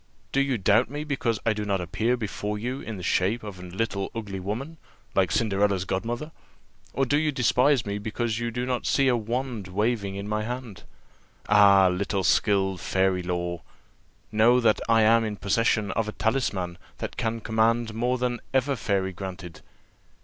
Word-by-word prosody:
Do 135 Hz, -, +2 dB
you 135 Hz, -3 st, +1 dB
doubt 105 Hz, +4 st, +3 dB
me 145 Hz, +2 st, -4 dB
because 130 Hz, -7 st, -1 dB
I 115 Hz, -, +3 dB
do 105 Hz, 0 st, -3 dB
not 100 Hz, -2 st, 0 dB
appear 110 Hz, +8 st, 0 dB
before 105 Hz, -1 st, -3 dB
you 125 Hz, +5 st, -3 dB
in 110 Hz, -3 st, -6 dB
the 90 Hz, -, -8 dB
shape 100 Hz, +7 st, +1 dB
of 100 Hz, -3 st, -8 dB
a -, -, -9 dB
little 95 Hz, +2 st, -3 dB
ugly 100 Hz, -4 st, -5 dB
woman, 120 Hz, -, -5 dB, 0.4 s
like 95 Hz, -2 st, +2 dB
Cinderella's 100 Hz, -2 st, +1 dB
godmother? 120 Hz, -, -3 dB, 0.6 s
or 135 Hz, -, 0 dB
do 145 Hz, +3 st, +2 dB
you 155 Hz, -1 st, +1 dB
despise 130 Hz, 0 st, +3 dB
me 100 Hz, 0 st, -3 dB
because 110 Hz, +1 st, -2 dB
you 120 Hz, 0 st, -2 dB
do 125 Hz, +2 st, -3 dB
not 125 Hz, -1 st, -2 dB
see 135 Hz, -1 st, +3 dB
a 125 Hz, -, +4 dB
wand 120 Hz, -2 st, -3 dB
waving 100 Hz, +1 st, -1 dB
in 100 Hz, +1 st, -5 dB
my 105 Hz, 0 st, -1 dB
hand? 120 Hz, -3 st, -6 dB, 0.6 s
'Ah, 100 Hz, -2 st, +6 dB
little 100 Hz, +1 st, -1 dB
skilled 95 Hz, +2 st, +2 dB
of -, -, -11 dB
fairy 95 Hz, -1 st, +1 dB
lore!' 85 Hz, -1 st, -3 dB, 0.7 s
know 115 Hz, +3 st, +5 dB
that 115 Hz, -3 st, +3 dB
I 115 Hz, -1 st, +5 dB
am 115 Hz, +1 st, +5 dB
in 105 Hz, -2 st, -3 dB
possession 105 Hz, +1 st, +1 dB
of 110 Hz, -1 st, -1 dB
a 110 Hz, -, -4 dB
talisman 100 Hz, -7 st, -1 dB, 0.2 s
that -, -, -5 dB
can 115 Hz, 0 st, -2 dB
command 110 Hz, +1 st, +1 dB
more 120 Hz, +3 st, 0 dB
than 120 Hz, -1 st, -1 dB, 0.2 s
ever 135 Hz, +1 st, +2 dB
fairy 95 Hz, -4 st, -1 dB
granted. 90 Hz, -2 st, -8 dB
110 Hz, 180 wpm, -26 LUFS, 95-120 Hz, 0.7 s, Ah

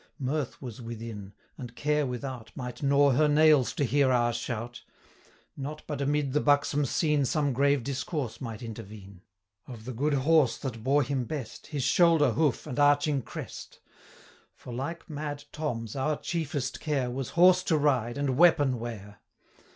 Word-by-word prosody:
Mirth 140 Hz, 0 st, -3 dB
was 125 Hz, -2 st, -8 dB
within; 115 Hz, -4 st, -7 dB, 0.3 s
and 120 Hz, -2 st, -8 dB
care 150 Hz, 0 st, 0 dB
without 125 Hz, -2 st, -5 dB
200 -, -, -16 dB
Might 125 Hz, -2 st, -6 dB
gnaw 140 Hz, 0 st, +4 dB
her 150 Hz, +4 st, +3 dB
nails 150 Hz, -3 st, +5 dB
to -, -, -1 dB
hear 135 Hz, +1 st, +2 dB
our 120 Hz, -1 st, +2 dB
shout. 120 Hz, 0 st, -5 dB, 0.7 s
Not 145 Hz, +2 st, -6 dB
but 145 Hz, -2 st, -4 dB
amid 140 Hz, -1 st, 0 dB
the 150 Hz, -, +2 dB
buxom 145 Hz, 0 st, +2 dB
scene 150 Hz, +2 st, +1 dB
Some 145 Hz, +1 st, 0 dB
grave 140 Hz, 0 st, +2 dB
discourse 135 Hz, -1 st, -4 dB
might 115 Hz, -1 st, -6 dB
intervene 100 Hz, -4 st, -9 dB, 0.5 s
Of 115 Hz, -4 st, -10 dB
the 130 Hz, -, -5 dB
good 145 Hz, +5 st, 0 dB
horse 145 Hz, 0 st, +3 dB
that 115 Hz, -5 st, -6 dB
bore 140 Hz, +3 st, +3 dB
him 135 Hz, -1 st, -2 dB
best, 120 Hz, -4 st, -6 dB
His 145 Hz, -3 st, -3 dB
shoulder, 165 Hz, -3 st, +4 dB
hoof, 145 Hz, 0 st, 0 dB
and 125 Hz, -, -5 dB
arching 145 Hz, 0 st, +3 dB
crest: -, -, -8 dB, 0.9 s
205 -, -, -24 dB
For, 125 Hz, -, -7 dB
like 145 Hz, +7 st, -5 dB
mad 145 Hz, -1 st, -5 dB
Tom's, 115 Hz, -7 st, -4 dB
our 145 Hz, +3 st, 0 dB
chiefest 150 Hz, -6 st, -3 dB
care, 135 Hz, -5 st, -1 dB
Was 130 Hz, 0 st, -4 dB
horse 180 Hz, +1 st, +7 dB
to 160 Hz, -, +2 dB
ride, 130 Hz, -5 st, +1 dB
and 140 Hz, -2 st, 0 dB
weapon 145 Hz, -7 st, +4 dB
wear. 105 Hz, -3 st, -8 dB
135 Hz, 165 wpm, -28 LUFS, 120-150 Hz, 0.9 s, horse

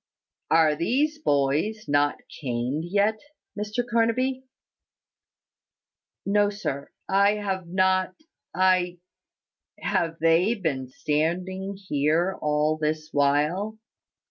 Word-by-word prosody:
"Are 160 Hz, -2 st, +4 dB
these 285 Hz, -, 0 dB
boys 150 Hz, -, 0 dB
not 145 Hz, 0 st, +2 dB, 0.3 s
caned 130 Hz, +4 st, -2 dB
yet, 205 Hz, +4 st, +1 dB, 0.4 s
Mr 215 Hz, +4 st, -3 dB
Carnaby?" 255 Hz, +3 st, +1 dB, 1.8 s
"No, 205 Hz, +1 st, +3 dB
sir: 170 Hz, -9 st, -4 dB, 0.2 s
I 200 Hz, +1 st, +4 dB
have 190 Hz, -4 st, -3 dB
not 185 Hz, +1 st, +1 dB, 0.4 s
I 185 Hz, -1 st, +2 dB, 0.4 s
" -, -, -35 dB
"Have 165 Hz, -1 st, 0 dB
they 165 Hz, +7 st, +3 dB
been 145 Hz, -, -2 dB
standing 180 Hz, +8 st, -2 dB
here 170 Hz, 0 st, +1 dB
all 150 Hz, +1 st, +1 dB
this 155 Hz, 0 st, -2 dB
while?" 150 Hz, +10 st, +1 dB
180 Hz, 95 wpm, -25 LUFS, 150-205 Hz, 1.8 s, Are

